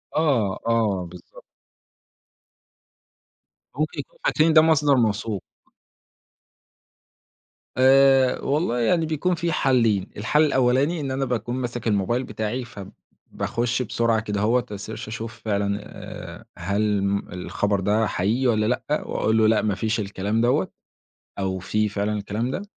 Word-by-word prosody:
آه، 130 Hz, -11 st, +1 dB
آه، 110 Hz, -6 st, +1 dB
بالضبط. 90 Hz, 0 st, -14 dB, 2.3 s
ممكن 155 Hz, +1 st, -2 dB
يكونوا -, -, -9 dB
فاكرين 160 Hz, +1 st, +3 dB
ده 155 Hz, -, +8 dB
مصدر 150 Hz, -3 st, +4 dB
موثوق. 110 Hz, -3 st, 0 dB, 2.3 s
آآ 135 Hz, 0 st, +5 dB
والله 140 Hz, -4 st, 0 dB
يعني 160 Hz, +8 st, +2 dB
بيكون 160 Hz, +3 st, 0 dB
في 170 Hz, -1 st, -2 dB
حلّين. 115 Hz, -9 st, +2 dB
الحل 150 Hz, +9 st, +2 dB
الأولاني 135 Hz, +4 st, +2 dB
إن 135 Hz, -2 st, -3 dB
أنا 135 Hz, +1 st, -1 dB
باكون 120 Hz, 0 st, -2 dB
ماسك 120 Hz, -2 st, -4 dB
الموبايل 110 Hz, +5 st, +1 dB
بتاعي، 110 Hz, +3 st, -3 dB
فباخش 115 Hz, +3 st, -5 dB
بسرعة 115 Hz, -1 st, +1 dB
كدهوّة، 110 Hz, +3 st, 0 dB
أsearch 100 Hz, +2 st, -7 dB, 0.2 s
أشوف 115 Hz, +1 st, -7 dB
فعلًا 100 Hz, -1 st, 0 dB
آآ -, -, -10 dB
هل 100 Hz, 0 st, 0 dB
م 100 Hz, 0 st, -1 dB
الخبر 100 Hz, +2 st, -1 dB
ده 105 Hz, +3 st, +1 dB
حقيقي 115 Hz, +10 st, 0 dB
والّا 110 Hz, -2 st, +2 dB
لأ، 130 Hz, +5 st, -1 dB
وأقول 110 Hz, +1 st, 0 dB
له: 110 Hz, -1 st, +4 dB
"لأ، 110 Hz, 0 st, +3 dB
ما 105 Hz, -3 st, 0 dB
فيش 110 Hz, +3 st, -1 dB
الكلام 100 Hz, +2 st, -1 dB
دوّة." 120 Hz, +1 st, +1 dB, 0.7 s
أو 95 Hz, -1 st, -1 dB
في 105 Hz, +3 st, 0 dB
فعلًا 100 Hz, +1 st, -2 dB
الكلام 105 Hz, +4 st, -3 dB
ده. 190 Hz, -, -3 dB
115 Hz, 130 wpm, -23 LUFS, 105-130 Hz, 2.3 s, ده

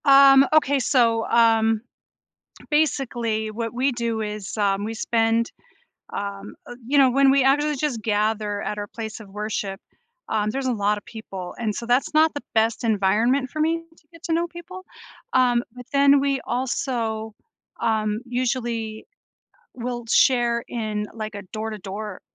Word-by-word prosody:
Um, 275 Hz, -1 st, +8 dB
okay, 285 Hz, -3 st, +4 dB
so, 230 Hz, -3 st, +2 dB
um, 225 Hz, -1 st, +3 dB, 0.9 s
basically 240 Hz, -8 st, 0 dB
what 230 Hz, +1 st, -4 dB
we 260 Hz, +3 st, +1 dB
do 235 Hz, -2 st, -2 dB
is, 210 Hz, -2 st, -5 dB
um, 200 Hz, -1 st, +1 dB
we 225 Hz, +1 st, -4 dB
spend, 225 Hz, 0 st, +1 dB, 0.6 s
um, 200 Hz, 0 st, -5 dB
uh, 245 Hz, -, -8 dB
you 285 Hz, +2 st, +2 dB
know 270 Hz, -2 st, +6 dB
when 270 Hz, +1 st, +5 dB
we 275 Hz, -1 st, +4 dB
actually 295 Hz, +3 st, +3 dB
just 265 Hz, -5 st, -2 dB
gather 210 Hz, -1 st, 0 dB
at 210 Hz, -, -3 dB
our 205 Hz, 0 st, -4 dB
place 220 Hz, 0 st, -7 dB
of 210 Hz, -3 st, -12 dB
worship, 205 Hz, -1 st, -4 dB, 0.5 s
um, 210 Hz, 0 st, 0 dB
there's 270 Hz, +3 st, -3 dB
a 255 Hz, -, +1 dB
lotta 205 Hz, -1 st, 0 dB
people, 195 Hz, -5 st, -8 dB
and 215 Hz, -3 st, -1 dB
so, 235 Hz, -, -5 dB
that's 245 Hz, +5 st, +1 dB
not 315 Hz, +1 st, +4 dB
the 290 Hz, -, -6 dB
best 225 Hz, +1 st, +2 dB
environment 225 Hz, +6 st, +2 dB
for 310 Hz, -, -7 dB
me 325 Hz, +2 st, +2 dB, 0.2 s
to 305 Hz, -, -27 dB
get 330 Hz, 0 st, -16 dB
to 330 Hz, -, -1 dB
know 340 Hz, +1 st, +1 dB
people, 345 Hz, +2 st, -10 dB, 0.5 s
um, 245 Hz, -2 st, +3 dB
but 250 Hz, 0 st, -10 dB
then 280 Hz, 0 st, +5 dB
we 275 Hz, -1 st, +1 dB
also, 235 Hz, -3 st, -2 dB, 0.5 s
um, 215 Hz, -1 st, 0 dB
usually 240 Hz, -3 st, -2 dB, 0.7 s
will 240 Hz, -1 st, -4 dB
share 240 Hz, -2 st, +3 dB
in, 215 Hz, -3 st, -3 dB
like, 215 Hz, -1 st, -5 dB
a 200 Hz, -, -6 dB
door-to-door 210 Hz, -2 st, -5 dB
230 Hz, 155 wpm, -23 LUFS, 215-270 Hz, 0.9 s, Um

